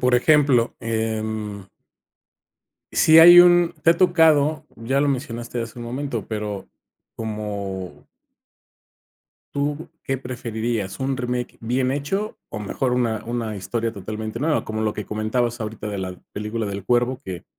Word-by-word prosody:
por 125 0 +3
ejemplo, 130 -2 +3
em 110 -2 -3 1.3
si 160 0 +6
hay 175 +1 +10
un 175 -1 +5
te 165 - +6
ha 170 - +3
tocado, 160 -4 +4
ya 130 +5 0
lo 145 - +2
mencionaste 120 -3 -3
hace 115 +1 -8
un 120 - -6
momento, 125 -2 -4
pero 105 -3 -4 0.5
como 100 -4 -5 1.5
¿tú 145 +2 -2 0.2
qué 135 - -1
preferirías? 115 -5 -4
¿Un 135 0 -1
remake 125 -1 -3
bien 125 +3 0
hecho, 170 +10 -2
o 110 - -5
mejor 125 +5 -1
una 115 -3 0
una 115 -3 -3
historia 115 +4 -2
totalmente 110 +2 -5
nueva? 150 +3 0
Como 110 0 -4
lo 110 -1 0
que 105 - -5
comentabas 115 +3 -1
ahorita 105 0 -5
de 100 -2 -4
la 95 -1 -4 0.2
película 105 +1 -3
del 100 -1 -5
cuervo 125 +3 +1
que 90 -2 -6
120 Hz, 145 wpm, -22 LUFS, 110-135 Hz, 1.5 s, hay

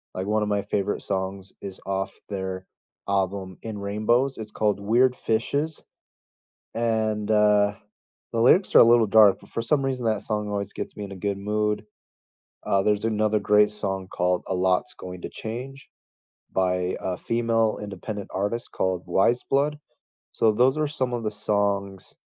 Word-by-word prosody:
like, 95 +1 -3
one 110 0 +1
of 105 - -2
my 100 -1 +1
favorite 105 0 -1
songs 95 0 -4
is 95 -2 -7
off 95 0 -3
their 95 -1 -4 0.4
album 95 -1 -1
In 110 -2 -6
Rainbows, 115 +7 +1
it's 110 -1 -7
called 105 -2 0
Weird 125 +5 +3
Fishes, 140 +8 -1 0.9
and, 110 -2 0
uh, 105 -1 +4 0.6
the 115 - +1
lyrics 180 - +4
are - - +10
a - - +10
little 115 -1 +5
dark, 105 -1 +6
but - - -17
for 115 - -3
some 140 +4 +1
reason 130 -3 -2
that 110 -2 +1
song 105 -1 -2
always 100 -1 -3
gets - - -6
me 105 - -5
in 100 - -10
a - - -7
good 100 +1 -2
mood. 105 +1 -1 0.8
Uh, 95 0 +1
there's 105 +1 +1
another 110 -1 +1
great 105 +1 +4
song 95 -3 -4
called 90 0 0
A 95 - -2
Lot's 95 +6 +1
Going 90 -1 -9
to - - -4
Change 130 +5 -7 0.6
by 90 -1 0
a 90 -1 -2
female, 115 -1 0
independent 100 0 -6
artist 105 +5 -2
called 95 -2 -1
Weyes 115 +7 +2
Blood. 145 +2 0 0.5
So, 110 -1 +3
those 125 +6 +3
are 155 - +1
some 130 -5 -2
of 120 - -3
the 105 - 0
songs 100 -2 -1
105 Hz, 170 wpm, -25 LUFS, 95-115 Hz, 0.9 s, are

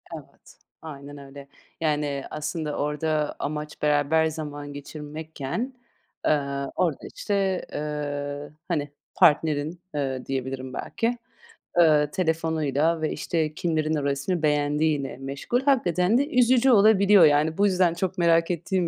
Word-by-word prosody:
Evet. - - -14 0.2
Aynen 145 -2 -9
öyle. 140 0 -11 0.3
Yani, 150 -3 0
aslında 150 0 -3
orada 150 +1 -1
amaç 150 +1 -5
beraber 150 +2 +3
zaman 145 -2 -6
geçirmekken, 155 - -6 0.5
ııı, 140 -2 0
orada, 170 -6 -1
işte, 195 -3 -1
ııı, 145 -1 -4
hani, 150 -5 -1 0.3
partnerin, 155 +2 +3 0.2
ııı, 135 -3 -2
diyebilirim 130 -1 -4
belki, 240 +1 -2 0.6
ııı, 150 -3 +5
telefonuyla 160 -3 0
ve, 155 - 0
işte, 155 0 -1
kimlerin 160 -1 0
o 145 - -2
resmi 140 +5 -1
beğendiğiyle 150 -2 +1
meşgul. 140 - -2
Hakikaten 215 - +2
de 280 +2 +1
üzücü 255 -2 +4
olabiliyor 200 -3 +6
yani. 150 +1 +3
Bu 200 - +4
yüzden 185 -3 +3
çok 180 +1 -3
merak 165 0 +3
ettiğim 175 +1 -1
155 Hz, 120 wpm, -25 LUFS, 145-175 Hz, 0.6 s, olabiliyor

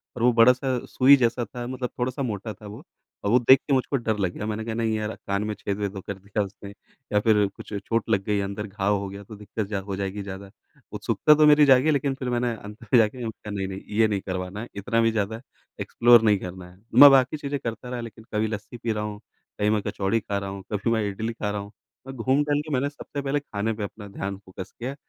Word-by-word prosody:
और 115 - -3
वो 125 - +6
बड़ा-सा 125 +2 +4
सुई 135 +2 +6
जैसा 120 -1 +1
था, 120 +4 -7
मतलब 125 -1 -4
थोड़ा-सा 130 +2 -2
मोटा 110 -2 -4
था 105 +2 -15
वो। 110 +9 -10 0.4
और 100 - 0
वो 125 - +6
देख 130 +3 +7
के 140 - +2
मुझको 135 +1 +1
डर 110 -4 -1
लग 95 -3 0
गया 105 - -5
मैंने 110 0 -3
कहा 115 - -3
नहीं 115 -1 0
यार 110 0 -3
कान 100 +1 0
में 105 0 -2
छेद-वेद 100 0 -3
ओ, - - -5
कर 100 - -5
दिया 100 +1 -2
उसने 100 0 -10 0.4
या 105 - +5
फ़िर 105 -1 +3
कुछ - - -10
चोट 105 +3 -2
लग 95 - +2
गई 105 -1 +1
अंदर 100 +2 -4
घाव 100 0 0
हो 100 - -4
गया 100 +1 -9
तो 105 +2 -11
दिक़्क़त 105 0 -5
जा 105 -2 -2
हो 95 - -3
जाएगी 100 +1 -3
ज़्यादा। 95 0 -8 0.4
उत्सुकता 150 - +3
तो 150 0 +5
मेरी 150 0 +7
जागी 135 +3 +5
लेक़िन 140 -1 +1
फ़िर 130 -2 -4
मैंने 120 -1 0
अंत 105 +2 -11
में 115 +3 +3
जाके 110 +3 +2
मैंने 120 -2 -3
कहा 105 - -10
नहीं-नहीं 95 -1 -4 0.2
ये 110 0 +5
नहीं 100 -3 -1
करवाना 95 +2 -4
है, 120 - -7
इतना 115 +4 0
भी 115 0 +3
ज़्यादा 110 +1 -2 0.4
एक्सप्लोर 120 -1 +5
नहीं 105 -2 +4
करना 90 0 -8
है। 90 - -20 0.2
मैं 140 +4 +11
बाकी 135 +3 +4
चीज़ें 140 -1 -3
करता 115 +2 -5
रहा 125 -1 -4
लेक़िन 110 -1 -10
कभी 110 +1 +1
लस्सी 105 +2 -6
पी 115 0 -2
रहा 105 -1 -2
हूँ, 105 -1 -5 0.4
कहीं 105 - +2
मैं 105 -1 +2
कचौड़ी 100 +3 0
ख़ा 100 -2 -3
रहा 100 -1 -4
हूँ, 95 0 -7
कभी 105 +3 0
मैं 110 -2 +1
इडली 110 +3 -4
ख़ा 105 -2 -3
रहा 105 0 -3
हूँ। 100 +1 -10 0.4
मैं 135 - -7
घूम-टहल 145 +4 +1
के 150 0 -6
मैंने 140 +2 +1
सबसे 145 0 -7
पहले 140 +1 0
ख़ाने 110 -4 -3
पे 105 -1 -5
अपना 105 +1 -7
ध्यान 100 0 -5
फ़ोकस 95 -1 -10
किया 130 +4 -4
110 Hz, 250 wpm, -25 LUFS, 100-125 Hz, 0.4 s, मैं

